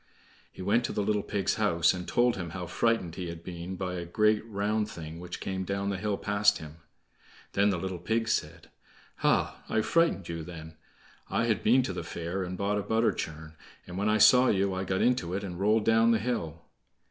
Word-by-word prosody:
He 95 Hz, -, -9 dB
went 110 Hz, +6 st, +2 dB
to -, -, -2 dB
the 105 Hz, -, 0 dB
little 105 Hz, 0 st, +1 dB
pig's 100 Hz, -2 st, -1 dB
house, 85 Hz, -6 st, +3 dB
and 90 Hz, -1 st, -6 dB
told 120 Hz, 0 st, +2 dB
him 90 Hz, -3 st, -5 dB
how 90 Hz, -, -4 dB
frightened 90 Hz, -1 st, 0 dB
he 90 Hz, 0 st, -5 dB
had 85 Hz, 0 st, -7 dB
been 90 Hz, +1 st, -6 dB
by 90 Hz, -1 st, -3 dB
a 90 Hz, -1 st, -4 dB
great 105 Hz, +5 st, +2 dB
round 105 Hz, 0 st, -1 dB
thing 80 Hz, -2 st, -8 dB
which 90 Hz, 0 st, -7 dB
came 95 Hz, -1 st, -3 dB
down 100 Hz, +1 st, -2 dB
the 100 Hz, -, -2 dB
hill 105 Hz, -1 st, -1 dB
past 100 Hz, 0 st, +2 dB
him. 75 Hz, 0 st, -10 dB, 0.8 s
Then 100 Hz, +1 st, +3 dB
the 95 Hz, -, 0 dB
little 95 Hz, 0 st, -4 dB
pig 115 Hz, +6 st, -1 dB
said: 115 Hz, -, -2 dB, 0.5 s
"Hah, -, -, +1 dB
I 110 Hz, -, +2 dB
frightened 165 Hz, -, +1 dB
you 85 Hz, -1 st, -4 dB
then. 80 Hz, -2 st, -9 dB, 0.5 s
I 115 Hz, -, +1 dB
had 110 Hz, -5 st, +1 dB
been 125 Hz, +3 st, +4 dB
to -, -, -3 dB
the -, -, -4 dB
fair 85 Hz, +3 st, -4 dB
and 90 Hz, 0 st, -4 dB
bought 100 Hz, +1 st, 0 dB
a -, -, -1 dB
butter 110 Hz, +3 st, +2 dB
churn, 80 Hz, 0 st, -6 dB, 0.3 s
and 90 Hz, -, -9 dB
when 100 Hz, +3 st, 0 dB
I 105 Hz, -, +3 dB
saw 125 Hz, +4 st, +7 dB
you, 100 Hz, -2 st, +2 dB
I 95 Hz, +1 st, -3 dB
got 95 Hz, 0 st, 0 dB
into 105 Hz, -8 st, +1 dB
it, 100 Hz, -, -3 dB
and 90 Hz, -3 st, -6 dB
rolled 105 Hz, +2 st, +2 dB
down 115 Hz, +1 st, +4 dB
the 115 Hz, -, +4 dB
hill." 85 Hz, -8 st, -3 dB
100 Hz, 215 wpm, -29 LUFS, 90-110 Hz, 0.8 s, saw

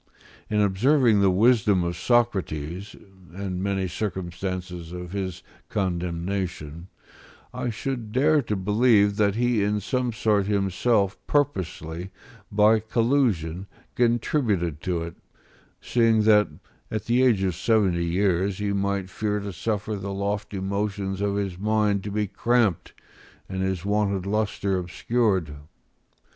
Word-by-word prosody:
In 105 Hz, -, +1 dB
observing 110 Hz, +3 st, +3 dB
the 100 Hz, -, +5 dB
wisdom 105 Hz, -1 st, +3 dB
of 85 Hz, 0 st, -2 dB
Socrates, 95 Hz, -6 st, 0 dB, 0.4 s
and 95 Hz, -2 st, -4 dB
many 95 Hz, -1 st, -1 dB
circumstances 90 Hz, -2 st, -4 dB
of 90 Hz, 0 st, -7 dB
his 95 Hz, -3 st, -4 dB, 0.3 s
condemnation, 85 Hz, -3 st, -3 dB, 0.7 s
I 125 Hz, -, -2 dB
should 115 Hz, -1 st, -4 dB
dare 145 Hz, +5 st, +3 dB
to 110 Hz, -4 st, -2 dB
believe 105 Hz, +1 st, +3 dB
that 100 Hz, -2 st, +2 dB
he 120 Hz, -2 st, +1 dB
in 105 Hz, +1 st, +1 dB
some 125 Hz, +4 st, -1 dB
sort 105 Hz, -3 st, +1 dB
himself 100 Hz, +1 st, +1 dB
purposely, 90 Hz, -, -1 dB, 0.4 s
by 105 Hz, +2 st, +5 dB
collusion, 110 Hz, -, 0 dB, 0.3 s
contributed 115 Hz, -, +1 dB
to 90 Hz, -3 st, -1 dB
it, 85 Hz, -1 st, -8 dB, 0.6 s
seeing 115 Hz, -2 st, +2 dB
that, 105 Hz, -1 st, +5 dB, 0.4 s
at 110 Hz, -2 st, -3 dB
the 120 Hz, +2 st, +2 dB
age 115 Hz, -7 st, +3 dB
of 95 Hz, -2 st, +1 dB
seventy 95 Hz, -3 st, +1 dB
years, 95 Hz, +2 st, +1 dB
he 105 Hz, -1 st, -1 dB
might 100 Hz, -1 st, -1 dB
fear 105 Hz, 0 st, -2 dB
to 100 Hz, -1 st, -6 dB
suffer 105 Hz, +3 st, -2 dB
the 100 Hz, 0 st, -5 dB
lofty 100 Hz, 0 st, -3 dB
motions 100 Hz, 0 st, -2 dB
of 100 Hz, -1 st, 0 dB
his 95 Hz, -3 st, -3 dB
mind 105 Hz, -1 st, +1 dB
to -, -, -3 dB
be 105 Hz, +1 st, 0 dB
cramped 115 Hz, -2 st, 0 dB, 0.5 s
and 95 Hz, 0 st, -4 dB
his 95 Hz, -1 st, -2 dB
wonted 100 Hz, -2 st, 0 dB
lustre 100 Hz, -2 st, 0 dB
obscured. 95 Hz, -2 st, 0 dB
100 Hz, 125 wpm, -25 LUFS, 95-110 Hz, 0.7 s, the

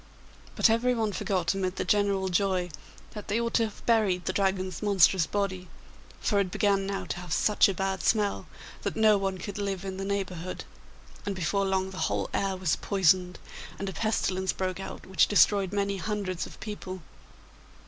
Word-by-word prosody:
But -, -, +5 dB
everyone 230 Hz, -2 st, +1 dB
forgot 185 Hz, -4 st, 0 dB
amid 185 Hz, -1 st, -2 dB
the -, -, -2 dB
general 200 Hz, -2 st, +2 dB
joy 185 Hz, -1 st, 0 dB, 0.4 s
that 210 Hz, -2 st, -8 dB
they 210 Hz, +3 st, 0 dB
ought 235 Hz, 0 st, -2 dB
to 230 Hz, -, +3 dB
have 215 Hz, -, -10 dB
buried 210 Hz, -6 st, +2 dB
the 185 Hz, -, -1 dB
Dragon's 190 Hz, -3 st, -1 dB
monstrous 190 Hz, -4 st, +4 dB
body, 190 Hz, -2 st, -2 dB, 0.5 s
for 205 Hz, -3 st, +1 dB
it 195 Hz, -2 st, +1 dB
began 195 Hz, 0 st, +1 dB
now 195 Hz, 0 st, -3 dB
to -, -, -4 dB
have 180 Hz, -2 st, -9 dB
such 210 Hz, +5 st, +4 dB
a -, -, 0 dB
bad 190 Hz, -1 st, -1 dB
smell 205 Hz, +4 st, +1 dB, 0.3 s
that -, -, -3 dB
no 215 Hz, -2 st, +5 dB
one 195 Hz, -1 st, -2 dB
could 200 Hz, +2 st, -6 dB
live 195 Hz, -2 st, -3 dB
in 190 Hz, -1 st, -4 dB
the 195 Hz, -, -4 dB
neighbourhood, 185 Hz, -3 st, -3 dB, 0.6 s
and 200 Hz, -, -3 dB
before 195 Hz, +3 st, 0 dB
long 190 Hz, 0 st, 0 dB
the 190 Hz, -, -7 dB
whole -, -, -2 dB
air 195 Hz, -1 st, 0 dB
was 180 Hz, -4 st, 0 dB
poisoned, 185 Hz, -2 st, +2 dB, 0.4 s
and 195 Hz, 0 st, -3 dB
a -, -, -6 dB
pestilence 190 Hz, -1 st, 0 dB
broke 185 Hz, 0 st, -3 dB
out 195 Hz, -, -7 dB
which 185 Hz, -4 st, +3 dB
destroyed 200 Hz, -2 st, +4 dB
many 200 Hz, -1 st, -1 dB
hundreds 190 Hz, -3 st, -3 dB
of -, -, -14 dB
people. 190 Hz, -4 st, -7 dB
195 Hz, 180 wpm, -28 LUFS, 185-205 Hz, 0.6 s, But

